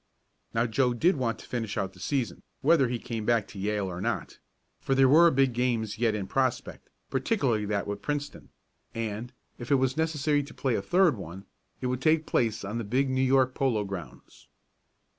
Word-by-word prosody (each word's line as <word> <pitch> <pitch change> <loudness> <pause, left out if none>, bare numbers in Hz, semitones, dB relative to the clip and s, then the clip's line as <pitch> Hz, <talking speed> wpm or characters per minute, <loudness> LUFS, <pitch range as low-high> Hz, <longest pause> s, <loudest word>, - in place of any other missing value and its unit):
Now 115 +1 +3
Joe 125 +1 +1
did 170 +9 +3
want 120 -3 -1
to - - -12
finish 115 -4 -4
out 95 -1 -2
the - - -17
season, 135 -5 -2 0.2
whether 145 -2 +4
he 120 - -1
came 115 -1 -5
back 115 -2 +1
to 100 - -9
Yale 105 0 -1
or 90 -1 -5
not, 120 +3 -3 0.4
for 135 - 0
there 135 0 +6
were 165 +5 +7
big 135 -4 +2
games 115 -3 -1
yet 115 -2 +2
in 100 -2 -3
prospect, 130 +4 -2 0.2
particularly 130 - +1
that 100 -1 -1
with 100 - -5
Princeton, 145 -1 -4 0.5
and, 115 +1 -4 0.3
if 120 - -7
it 140 - +5
was 130 0 +1
necessary 150 -2 +1
to 140 - -10
play 130 -3 0
a 105 - 0
third 180 - +3
one, 95 +2 -9 0.4
it - - -3
would 125 0 -1
take 155 +2 +3
place 110 -4 0
on 105 +4 -3
the - - -3
big 130 +6 0
New 130 0 +1
York 130 -1 +3
Polo 125 -7 +1
Grounds. 95 -4 -9
125 Hz, 200 wpm, -28 LUFS, 110-135 Hz, 0.5 s, were